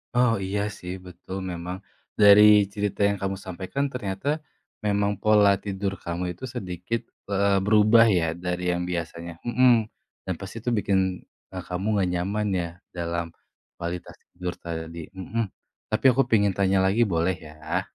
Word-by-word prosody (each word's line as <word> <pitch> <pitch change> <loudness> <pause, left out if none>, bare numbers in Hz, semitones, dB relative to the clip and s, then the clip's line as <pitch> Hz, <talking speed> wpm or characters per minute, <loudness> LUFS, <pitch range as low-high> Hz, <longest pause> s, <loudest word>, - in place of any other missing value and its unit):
Oh 125 -2 +4
iya 100 +2 -1 0.2
sih, 90 +1 -6
betul 90 +1 -8
memang. 90 +2 -5 0.4
Dari 105 0 +9 0.3
cerita 105 -1 -2
yang 100 - +1
kamu 95 0 -2
sampaikan 95 +10 -3
ternyata, 100 0 -4 0.6
memang 100 0 +2
pola 105 -1 +5
tidur 100 -1 -2
kamu 85 +1 -3
itu 90 - -17
sedikit, 95 +1 -3 0.3
eee, 100 -1 +2
berubah 110 +2 +6
ya 80 - 0
dari 90 0 -3
yang 90 - -2
biasanya 85 0 -4
hmm, 125 +1 +5 0.5
dan 95 - 0
pasti 95 - -8
itu 120 - -2
bikin, 100 -1 +1 0.6
eee, 90 -1 -5
kamu 90 +2 -3
nggak 95 -3 +1
nyaman 100 +4 -1
ya 85 - -2 0.3
dalam 85 0 -2 0.5
kualitas 85 +1 -5 0.2
tidur 90 0 -4
tadi 85 0 -5
mhm, 110 +5 -2 0.4
tapi 110 +5 -2
aku 135 +2 +3
pingin 100 -3 +4
tanya 95 -1 +3
lagi 100 +5 +2
boleh 85 +3 +1
ya? 80 +1 -4
95 Hz, 150 wpm, -25 LUFS, 90-105 Hz, 0.6 s, Dari